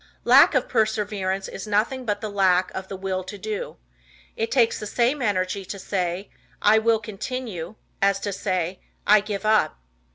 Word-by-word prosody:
Lack 270 +4 +7
of 260 - +2
Perseverance 210 -4 0
is 195 - -7
nothing 225 +5 0
but 205 -2 -1
the 215 - -3
lack 185 -2 +3
of 190 0 -5
the 195 - -6
Will 190 0 -3
To 190 +3 -8
Do. 210 +1 -5 0.6
It 225 - -2
takes 240 -4 +2
the 210 - -5
same 245 +6 +1
energy 195 -3 0
to 200 - -6
say, 185 0 -3 0.3
"I 215 +1 +5
will 225 0 +3
continue," 215 -3 -6 0.3
as 195 0 +3
to 205 - -3
say, 185 -2 -2 0.3
"I 210 +1 +7
give 205 0 -5
up." 215 - +3
205 Hz, 170 wpm, -24 LUFS, 190-220 Hz, 0.6 s, Lack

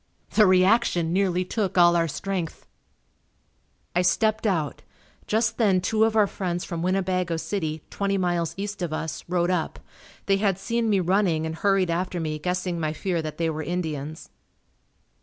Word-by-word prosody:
The 215 -2 +5
reaction 185 -2 +3
nearly 185 -1 +1
took 195 -1 -2
all 175 -1 +6
our 165 -1 +2
strength. 180 +1 -4 1.3
I 180 - +4
stepped 215 +5 +2
out. 160 -8 -1 0.5
Just 220 +1 0
then 200 -5 +4
two 215 +4 +2
of 225 0 0
our 215 -2 +5
friends 180 -3 -3
from 170 -3 -4
Winnebago 185 -2 0
City, 160 -4 -3
twenty 200 0 0
miles 175 -3 0
east 205 0 -5
of 170 -3 -2
us, 160 0 -4
rode 175 0 +1
up. 175 -3 -1 0.5
They 195 -1 +3
had 195 -2 +1
seen 230 +3 -1
me 200 -2 +3
running 180 -3 +1
and 160 - -3
hurried 195 -1 +2
after 180 +1 -2
me 155 -2 -3
guessing 180 +1 -2
my 155 -1 -1
fear 175 +1 -1
that 155 -1 -6
they 165 -1 0
were 155 0 -4
Indians. 155 -3 -4
180 Hz, 165 wpm, -25 LUFS, 165-195 Hz, 1.3 s, all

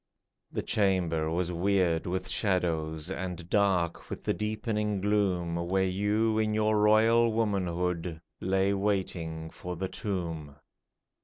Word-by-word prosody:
The - - -3
chamber 90 -6 +1
was 85 +2 -1
weird 90 -2 +1
with 90 +1 -2
shadows 85 -4 0
And 90 -2 -5
dark 95 -5 +1
with - - -6
the - - +1
deepening 105 -1 -1
gloom 95 -4 +1
Where 95 +3 +1
you 105 +4 +1
in 110 -1 +1
your 110 0 +2
royal 110 +2 +5
womanhood, 90 -6 -1 0.2
Lay 95 +1 +1
waiting 90 -5 -2
for 90 0 -6
the 95 +2 -3
tomb. 85 - -4
95 Hz, 125 wpm, -29 LUFS, 85-105 Hz, 0.2 s, royal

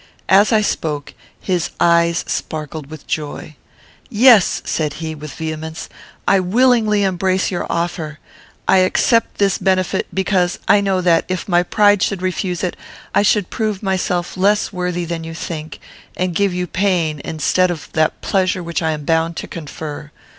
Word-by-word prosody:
As 200 +4 +5
I 220 -2 +4
spoke, 150 -8 -2 0.3
his 180 -3 -1
eyes 170 0 +3
sparkled 155 -2 -4
with 155 0 -11
joy. 150 0 -5 0.5
"Yes," 225 -3 +5
said 150 -3 -1
he, 160 0 -5
with 150 -2 -9
vehemence, 160 0 -5 0.4
"I 195 - +5
willingly 215 +1 +3
embrace 190 0 0
your 175 - -3
offer. 170 -3 -2 0.5
I 190 - +5
accept 225 +5 +2
this 200 -2 +2
benefit, 185 -1 0
because 185 -2 0
I 205 - +5
know 195 -2 +1
that, 170 -2 +3
if 185 -1 -3
my 175 -2 +3
pride 205 +2 +3
should 195 -2 -1
refuse 185 -1 -2
it, 180 - -1 0.4
I - - +4
should 205 -2 +2
prove 215 -3 -2
myself 180 -2 -1
less 205 +3 +1
worthy 180 -1 -2
than 165 -1 -4
you 165 0 -7
think, 160 -1 -6 0.4
and 180 -1 -1
give 200 +2 +1
you 180 0 -2
pain, 175 -5 0
instead 180 +3 +1
of 170 -4 -5
that 155 -1 +1
pleasure 185 -1 0
which 170 0 -3
I 160 -1 0
am 150 -1 -6
bound 165 +1 +1
to - - -5
confer. 150 -1 -7
180 Hz, 160 wpm, -18 LUFS, 160-195 Hz, 0.5 s, As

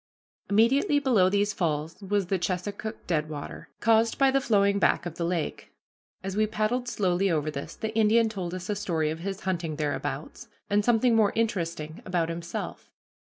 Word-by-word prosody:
Immediately 235 +8 +4
below 240 -10 +4
these 205 +1 +1
falls 160 +1 -2
was 200 0 0
the 190 +1 -1
Chesuncook 200 +5 -4
Deadwater, 155 -3 -3
caused 225 0 +3
by 270 -1 +4
the 275 +1 +2
flowing 200 -4 +3
back - - +2
of 175 - -4
the 170 - -4
lake. 170 -2 -3 0.5
As 195 0 -4
we 215 +1 +2
paddled 220 +4 -1
slowly 195 -3 +1
over 155 -2 0
this, 140 -1 -6
the 220 0 -4
Indian 225 +1 +4
told 185 -5 -4
us 180 0 -6
a 210 - -1
story 165 -6 -1
of 160 - -5
his 195 +2 -4
hunting 170 -4 -2
thereabouts, 150 -1 -4 0.2
and 205 0 +3
something 235 +1 +3
more 215 -3 +3
interesting 170 -8 -2
about 175 -3 -1
himself. 170 0 -5
195 Hz, 170 wpm, -27 LUFS, 170-220 Hz, 0.5 s, Immediately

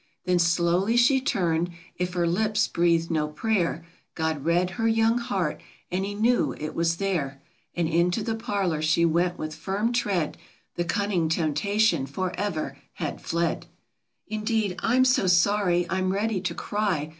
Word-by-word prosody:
Then 180 -1 +2
slowly 170 +6 +2
she 260 +2 +4
turned, 175 - 0
— - - -25
if 180 0 -3
her 175 -1 +1
lips 210 +5 +1
breathed 170 -1 +1
no 155 -2 +1
prayer, 170 0 -1 0.3
God 160 -3 -1
read 175 +2 +2
her 225 +1 -1
young 225 +1 +3
heart, 195 -10 -2 0.3
and 185 +2 0
He 205 +1 -4
knew 235 +4 +2
it 155 - -5
was 165 0 +1
there; 170 -8 -2 0.4
And 170 -2 0
into 175 +6 +1
the 225 - -1
parlor 195 -7 -1
she 155 +2 +3
went 175 +2 +1
with 155 0 -5
firm 205 +8 -2
tread; 195 -9 -1 0.3
The 175 - -2
cunning 180 -2 0
temptation 165 +1 +1
forever 185 +3 -3
had - - -5
fled. 170 0 -1 0.6
"Indeed, 215 -2 -1
I'm 255 +3 +3
so 250 -7 +3
sorry, 180 -1 +3
I'm 185 +1 0
ready 205 0 -1
to - - -3
cry! 195 -8 -1
180 Hz, 155 wpm, -26 LUFS, 170-210 Hz, 0.6 s, she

